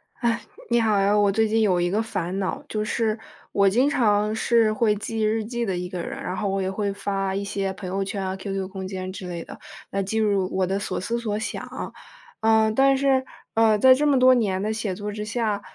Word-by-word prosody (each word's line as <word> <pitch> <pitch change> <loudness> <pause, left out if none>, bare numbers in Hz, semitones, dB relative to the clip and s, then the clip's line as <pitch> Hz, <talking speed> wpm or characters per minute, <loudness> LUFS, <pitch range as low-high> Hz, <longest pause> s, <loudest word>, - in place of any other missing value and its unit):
唉， 235 -1 0 0.3
你 235 - +4
好 215 -3 +2
呀， 200 +1 +3
我 205 -1 +4
最 220 +2 +2
近 225 +1 +2
有 190 -5 +3
一 175 0 0
个 210 +3 +1
烦 190 -4 -3
恼， 190 -1 -3
就 215 -1 -2
是 220 0 0 0.3
我 200 -1 +4
经 250 +7 +3
常 210 -5 +2
是 225 0 +3
会 215 -1 +2
记 220 +2 -4
日 215 0 +1
记 240 +1 -3
的 190 -4 -1
一 180 0 -3
个 180 -1 -5
人， - - -6
然 180 - -3
后 200 - -1
我 195 0 -1
也 190 - -1
会 200 +1 -1
发 195 -1 -2
一 200 - -2
些 195 -1 -2
朋 190 -1 -8
友 195 +2 -1
圈 195 0 -4
啊 190 0 -2
，qq 195 0 -4
空 190 0 -6
间 185 -1 -5
之 185 -1 -7
类 170 -2 -5
的， - - -11 0.3
来 195 - 0
记录 200 -2 +1
我 190 0 +2
的 195 +2 -1
所 - - -3
思 230 +6 -2
所 215 -3 -2
想。 215 - -5 0.5
嗯， 220 -1 +3
但 270 +3 +4
是， 270 -1 +2 0.3
呃， 220 -1 +4
在 260 +5 +7
这 295 +3 +1
么 280 -2 +4
多 255 0 +7
年 200 -6 +1
的 215 +2 -1
写 215 -4 -3
作 205 +2 -5
之 210 0 -5
下， 210 -2 -1
210 Hz, 260 characters per minute, -24 LUFS, 195-225 Hz, 0.5 s, 在